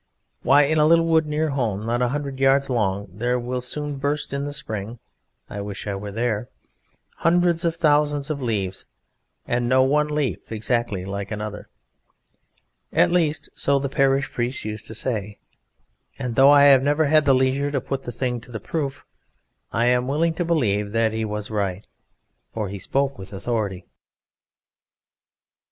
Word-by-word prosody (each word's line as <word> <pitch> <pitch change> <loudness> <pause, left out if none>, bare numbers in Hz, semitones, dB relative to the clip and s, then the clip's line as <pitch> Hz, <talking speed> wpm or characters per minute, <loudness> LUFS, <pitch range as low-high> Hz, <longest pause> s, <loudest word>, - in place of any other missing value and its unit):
Why, 145 +2 +5
in 155 +2 +2
a 150 - +5
little 165 +1 +5
wood 160 -1 +3
near 155 +1 0
home, 110 -7 -2
not 120 +2 0
a 125 - +3
hundred 140 0 -4
yards 135 0 +3
long, 100 -4 0
there 120 +5 0
will 125 +1 -3
soon 145 +3 -4
burst, 145 +1 -2
in 140 0 -2
the 145 - -4
spring 115 -6 -5 0.5
(I 100 - -6
wish 100 0 -6
I 100 - -2
were 100 +1 -5
there!), 115 +1 -2 0.7
hundreds 175 0 +2
of 165 -1 +1
thousands 150 -2 +2
of 140 -2 -4
leaves, 100 -6 -2 0.6
and 120 0 0
no 130 +1 +5
one 150 +3 +2
leaf 150 -6 -2
exactly 110 -3 -1
like 100 0 -5
another. 105 -1 -6 1.2
At - - +3
least, 160 -4 +1
so 140 0 +1
the 140 0 -2
parish 135 0 +1
priest 120 +1 -2
used 105 0 -6
to 110 - -7
say, 105 -4 -3 0.8
and 125 -3 -3
though 135 +3 +6
I 145 -1 +7
have 140 -2 +7
never 145 +3 +2
had 155 +1 +4
the 135 -2 +5
leisure 130 +2 +1
to 145 -1 -1
put 135 +1 -4
the 120 - -6
thing 125 0 -2
to 120 - -14
the 110 - -5
proof, 140 +4 -4 0.7
I 115 - +1
am 125 0 +3
willing 160 +4 +1
to 175 - -2
believe 105 -12 0
that 115 -1 +2
he 110 0 -1
was 105 0 -4
right, 100 -2 -2 0.7
for 105 -3 -2
he 100 0 -6
spoke 135 +4 -1
with 95 0 -9
authority. 100 -3 -3
130 Hz, 175 wpm, -23 LUFS, 110-145 Hz, 1.2 s, I